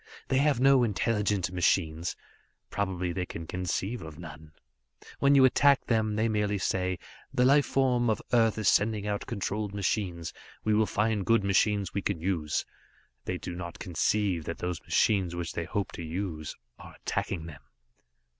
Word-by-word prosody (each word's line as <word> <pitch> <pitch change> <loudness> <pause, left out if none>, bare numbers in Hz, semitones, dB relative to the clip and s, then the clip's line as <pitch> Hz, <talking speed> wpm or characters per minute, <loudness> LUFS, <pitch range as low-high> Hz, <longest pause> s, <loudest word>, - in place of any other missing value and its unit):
They 130 - +3
have 145 -3 +3
no 135 0 +6
intelligent 105 -4 0
machines; 85 -2 +1 0.6
probably 90 -3 -2
they 90 -1 -3
can 80 0 -7
conceive 90 +6 -3
of 80 -2 -9
none. 80 -2 -10 0.7
When 140 0 +5
you 135 -1 +7
attack 140 +1 +4
them, 110 -2 +1
they 110 +2 +2
merely 105 -2 0
say 95 -1 -1 0.3
'The 125 - +2
life 140 +2 +5
form 125 -3 +2
of 110 - +1
Earth 115 -2 +4
is 110 -3 -1
sending 105 0 +3
out 105 -1 -2
controlled 105 -1 -3
machines. 90 -4 -2 0.3
We 110 - +2
will 110 0 +3
find 105 -1 0
good 115 +1 +3
machines 100 0 +2
we 100 - -1
can 95 -3 -2
use.' 80 -4 -1 0.6
They 90 - -2
do 90 - -6
not 85 -1 -6
conceive 90 -1 0
that 85 - -4
those 90 -4 -3
machines 95 -5 +1
which 85 -2 -4
they 85 - -3
hope 100 +3 -2
to - - -7
use 80 -2 -4 0.2
are - - -12
attacking 85 -5 -3
them. 75 -4 -10
100 Hz, 165 wpm, -29 LUFS, 85-110 Hz, 0.7 s, you